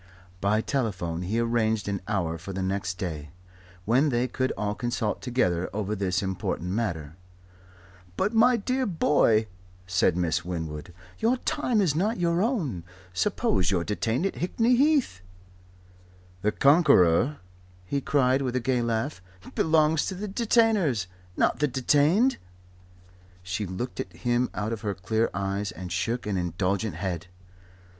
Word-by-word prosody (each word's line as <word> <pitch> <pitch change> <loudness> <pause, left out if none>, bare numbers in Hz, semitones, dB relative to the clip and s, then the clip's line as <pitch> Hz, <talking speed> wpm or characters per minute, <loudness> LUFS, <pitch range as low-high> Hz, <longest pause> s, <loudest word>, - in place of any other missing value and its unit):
By 105 +3 +2
telephone 95 -11 -2
he 95 +5 -2
arranged 110 -2 +1
an 100 -2 -2
hour 85 -6 -1
for 95 +4 -7
the 95 0 -3
next 95 -1 -2
day, 80 -6 -5 0.6
when 130 +7 +3
they 120 -1 +1
could 130 0 -1
all 105 -1 -2
consult 115 -1 -2
together 90 -9 0
over 105 0 -2
this 95 -1 -1
important 90 -2 -3
matter. 85 -8 -3 1.0
"But, 205 +4 0
my 240 +2 +5
dear 255 +4 -1
boy," 145 - +3 0.4
said 90 -1 +2
Miss 85 -1 0
Winwood, 80 -2 -5 0.3
"your 235 +3 +2
time 250 -5 0
is 175 -7 +2
not 200 +9 0
your 170 0 +1
own. 170 - -1 0.3
Suppose 90 -1 +1
you're 90 -3 +1
detained 110 - -1
at 195 - -2
Hickney 225 +7 +2
Heath?" 275 - +2 1.2
"The 105 - +2
Conqueror," 140 - +4 0.5
he 140 +9 -1
cried, 130 -1 +2
with 130 -2 -2
a - - +2
gay 125 0 0
laugh, 115 +1 -2 0.3
"belongs 155 -1 +3
to 190 - -3
the 205 +3 -5
Detainers 205 - +2 0.3
not - - +2
the 150 - +3
Detained." 150 - +3 1.1
She 95 +3 -3
looked 95 +8 -5
at 90 - -4
him 120 +8 0
out 105 +2 -2
of 110 - -5
her 105 -3 -2
clear 110 +5 0
eyes, 100 0 -2
and 90 0 -8
shook 115 +7 -1
an 105 -2 -1
indulgent 90 +4 -1
head. 90 -4 -4
110 Hz, 145 wpm, -26 LUFS, 95-150 Hz, 1.2 s, my